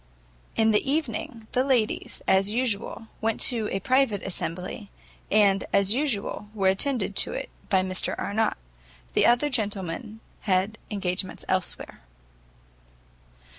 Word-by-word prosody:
In 220 0 +4
the 215 +6 +2
evening, 240 -6 -2
the 255 - +2
ladies, 250 -5 0
as 190 +1 +4
usual, 225 -1 -1 0.2
went 225 0 0
to 225 -4 +2
a 195 - -1
private 255 -4 +2
assembly, 185 +2 -4 0.4
and, 200 -2 +4
as 200 +1 +4
usual, 230 -6 -1
were 195 -2 +3
attended 200 0 0
to - - +3
it - - -5 0.2
by 190 -1 +3
Mr 185 0 0
Arnott. 220 +1 0 0.6
The - - +4
other 245 +5 +3
gentlemen 210 -1 -3 0.2
had 195 +3 0
engagements 190 -2 -2
elsewhere. 185 -1 0
210 Hz, 125 wpm, -26 LUFS, 195-235 Hz, 0.6 s, In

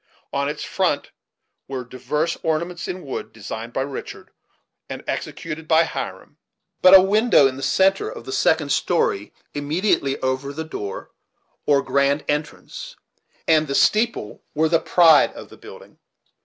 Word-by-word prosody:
On 140 0 0
its 150 - -5
front - - -1 0.6
were 130 -2 -4
divers 130 +7 -2
ornaments 170 +2 -2
in 180 -2 -6
wood, 135 - -5
designed 110 +2 -7
by 130 - -2
Richard 135 -1 -8 0.6
and - - -7
executed 160 -1 -5
by 160 +1 +5
Hiram; - - -6 0.4
but 185 +1 +9
a 190 - +10
window 210 - +4
in 130 -1 +1
the 135 - -8
centre 190 - +2
of 115 - -9
the 130 - -6
second 145 +2 +1
story, 120 - 0 0.2
immediately 145 -1 0
over 130 +2 -2
the 160 +2 -4
door 105 -10 -7 0.6
or 140 -1 +4
grand 140 +1 +1
entrance, 150 +1 -4 0.5
and 155 -1 +4
the 140 - -2
"steeple" 215 - +1
were 160 +1 +2
the 165 0 +3
pride 165 -4 +5
of - - -11
the - - -13
building. - - -14
150 Hz, 150 wpm, -22 LUFS, 135-165 Hz, 0.6 s, a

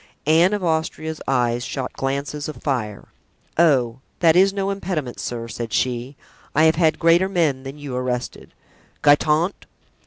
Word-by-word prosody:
Anne 165 +5 +4
of 205 -2 -2
Austria's 160 -1 -2
eyes 120 -2 +1
shot 130 +1 -4
glances 140 +2 -3
of 155 - -6
fire. 115 -8 -3 0.5
"Oh! 130 -8 +3 0.2
that 165 -2 +5
is 190 +2 +5
no 195 0 -2
impediment, 175 -10 -4
sir," 115 -1 -4
said 115 0 -6
she; 125 +2 -1 0.4
"I 155 - +4
have 160 0 +6
had 160 -1 +2
greater 170 +3 +4
men 160 -8 +1
than 135 +2 -8
you 145 -3 -6
arrested—Guitant!" 145 +6 -1
150 Hz, 145 wpm, -22 LUFS, 125-165 Hz, 0.5 s, have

